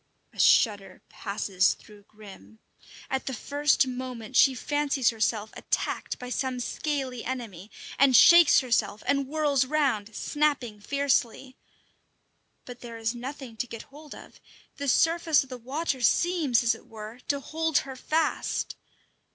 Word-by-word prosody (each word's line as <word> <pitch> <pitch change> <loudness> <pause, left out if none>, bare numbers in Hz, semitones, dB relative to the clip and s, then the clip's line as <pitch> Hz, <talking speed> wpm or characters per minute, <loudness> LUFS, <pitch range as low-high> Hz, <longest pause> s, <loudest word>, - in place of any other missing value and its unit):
A - - -15
shudder 200 -5 +3
passes 200 -2 0
through 205 -2 -18
Grim. 215 +1 -15 0.5
At 265 0 -3
the 265 - -2
first 285 +3 +1
moment 250 -2 -7
she 265 0 +5
fancies 285 0 0
herself 220 -1 -1
attacked - - -3
by 250 0 -8
some 255 -1 -2
scaly 265 -2 -3
enemy, 220 -7 -6 0.3
and 270 -1 +5
shakes 340 +3 +8
herself 225 -5 -1
and 280 -1 0
whirls 290 -2 +1
round, 255 -7 -1
snapping 285 -8 -1
fiercely. 265 +1 -1 1.1
But 245 -1 -10
there 235 -2 -9
is 225 +1 -2
nothing 255 0 -8
to 250 - -3
get 230 -1 -8
hold 300 0 -11
of; - - -14 0.4
the 280 - -4
surface 325 +2 +3
of 270 - -17
the 255 -1 -7
water 270 +2 -3
seems, 295 - +2
as 235 - +3
it - - -13
were, 220 +2 -10
to 280 - 0
hold 320 +2 -1
her 265 -1 -8
fast. 310 +4 -1
255 Hz, 145 wpm, -27 LUFS, 225-285 Hz, 1.1 s, shakes